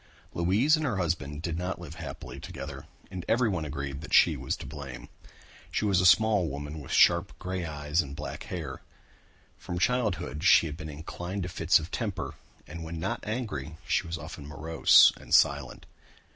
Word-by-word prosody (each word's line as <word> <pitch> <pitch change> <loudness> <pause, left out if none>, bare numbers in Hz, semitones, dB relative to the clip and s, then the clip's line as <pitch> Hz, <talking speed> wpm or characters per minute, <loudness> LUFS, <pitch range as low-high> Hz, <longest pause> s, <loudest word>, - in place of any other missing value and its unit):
Louise 100 - +3
and 155 - -3
her 120 -9 0
husband 80 -4 -2
did 85 -1 -2
not 90 +1 -3
live 85 -3 -8
happily 80 - -8
together 70 -1 -8 0.2
and 95 -2 -5
everyone 110 -9 +1
agreed 70 -1 -5
that 85 - -1
she - - +6
was - - -2
to - - -9
blame. 70 -3 -8 0.6
She - - -1
was 95 -3 +3
a 90 - +5
small 105 -1 +5
woman 75 +3 -6
with 70 - -9
sharp - - +4
grey 90 -1 -4
eyes 75 +1 0
and 70 -3 -8
black 75 0 -6
hair. - - -6 0.8
From 90 - -5
childhood 90 -8 0
she 95 - +6
had 75 -2 -4
been 80 -1 -7
inclined 85 +6 -5
to 90 - -4
fits 85 0 +3
of 80 +1 -6
temper 100 -5 -3 0.3
and 80 +2 -8
when 80 0 -6
not - - -3
angry 100 - -4
she 90 0 +1
was 85 0 -3
often 70 - -9
morose 80 +2 +5
and - - +1
silent. 70 -2 +2
85 Hz, 180 wpm, -28 LUFS, 75-95 Hz, 0.8 s, she